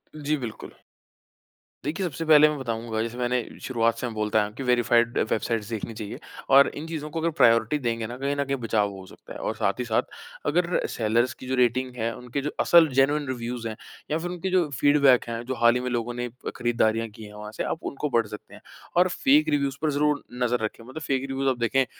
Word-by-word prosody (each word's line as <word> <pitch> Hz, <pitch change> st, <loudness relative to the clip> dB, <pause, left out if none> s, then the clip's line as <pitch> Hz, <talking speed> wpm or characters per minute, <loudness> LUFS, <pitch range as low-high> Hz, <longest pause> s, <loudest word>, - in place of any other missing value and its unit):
जी, 150 Hz, 0 st, -1 dB
बिल्कुल। 120 Hz, -5 st, -7 dB, 1.1 s
देखिए 160 Hz, +6 st, -2 dB
सबसे 165 Hz, -1 st, -4 dB
पहले 155 Hz, -1 st, +7 dB
मैं 150 Hz, -, -3 dB
बताऊँगा 115 Hz, -3 st, -3 dB
जैसे 115 Hz, +2 st, -4 dB
मैंने 125 Hz, 0 st, 0 dB, 0.2 s
शुरुआत 115 Hz, -3 st, +1 dB
से 125 Hz, -, -2 dB
मैं 115 Hz, -, -6 dB
बोलता 105 Hz, 0 st, 0 dB
आया 105 Hz, -, +1 dB
हूँ 105 Hz, -, -12 dB
कि 135 Hz, -, -5 dB
वेरिफाइड 120 Hz, -1 st, +2 dB
वेबसाइट्स 110 Hz, -1 st, -1 dB
देखनी 115 Hz, 0 st, -4 dB
चाहिए 105 Hz, -2 st, -7 dB, 0.3 s
और 140 Hz, +1 st, +7 dB
इन 155 Hz, +2 st, -6 dB
चीज़ों 155 Hz, -2 st, -5 dB
को 165 Hz, -, -4 dB
अगर 165 Hz, +1 st, +1 dB
प्रायोरिटी 115 Hz, +4 st, +5 dB
देंगे 115 Hz, -3 st, -2 dB
ना 120 Hz, -, -6 dB
कहीं 140 Hz, +2 st, -1 dB
न 140 Hz, -, 0 dB
कहीं 140 Hz, 0 st, -1 dB
बचाव 105 Hz, -3 st, +1 dB
हो 95 Hz, -1 st, -10 dB
सकता -, -, -13 dB
है -, -, -8 dB
और -, -, -2 dB
साथ 100 Hz, -, +1 dB
ही 125 Hz, -, -1 dB
साथ, 110 Hz, -1 st, +2 dB, 0.4 s
अगर 175 Hz, +4 st, +1 dB
सेलर्स 120 Hz, +2 st, +1 dB
की 130 Hz, -, -11 dB
जो 130 Hz, -, 0 dB
रेटिंग 125 Hz, +1 st, +1 dB
है 115 Hz, -1 st, -1 dB
उनके 125 Hz, +3 st, -4 dB
जो 145 Hz, -, -2 dB
असल 170 Hz, -2 st, +6 dB
जेनुइन 145 Hz, +2 st, +2 dB
रिव्यूज़ 120 Hz, -2 st, -4 dB
हैं 110 Hz, -, -5 dB, 0.4 s
या 155 Hz, -, +2 dB
फिर 175 Hz, +2 st, -4 dB
उनके 180 Hz, +1 st, -3 dB
जो 180 Hz, -3 st, +3 dB
फीडबैक 140 Hz, -3 st, +5 dB
है 115 Hz, 0 st, -4 dB
जो 130 Hz, +1 st, -3 dB
हाल 120 Hz, 0 st, +5 dB
ही -, -, +1 dB
में 125 Hz, -, -2 dB
लोगों 120 Hz, -1 st, -2 dB
ने 120 Hz, 0 st, -3 dB, 0.3 s
खरीदारियाँ 115 Hz, -1 st, +1 dB
की 110 Hz, +1 st, -12 dB
है 105 Hz, 0 st, -11 dB
वहाँ 105 Hz, 0 st, -8 dB
से -, -, -1 dB
आप 160 Hz, -, -3 dB
उनको 145 Hz, +2 st, -3 dB
पढ़ 115 Hz, -3 st, +2 dB
सकते 105 Hz, 0 st, -10 dB
हैं। -, -, -13 dB, 0.4 s
और 180 Hz, +1 st, +6 dB
फेक 280 Hz, +10 st, +3 dB
रिव्यूज़ 140 Hz, -1 st, 0 dB
पर 155 Hz, -1 st, +1 dB
ज़रूर 150 Hz, +1 st, +1 dB, 0.2 s
नज़र 125 Hz, 0 st, +1 dB
रखें, 110 Hz, +1 st, -4 dB
मतलब 130 Hz, +7 st, -9 dB
फेक 135 Hz, -2 st, -1 dB
रिव्यूज़ 135 Hz, 0 st, 0 dB
आप 130 Hz, -, 0 dB
देखें 125 Hz, +3 st, +2 dB
125 Hz, 230 wpm, -25 LUFS, 115-145 Hz, 1.1 s, पहले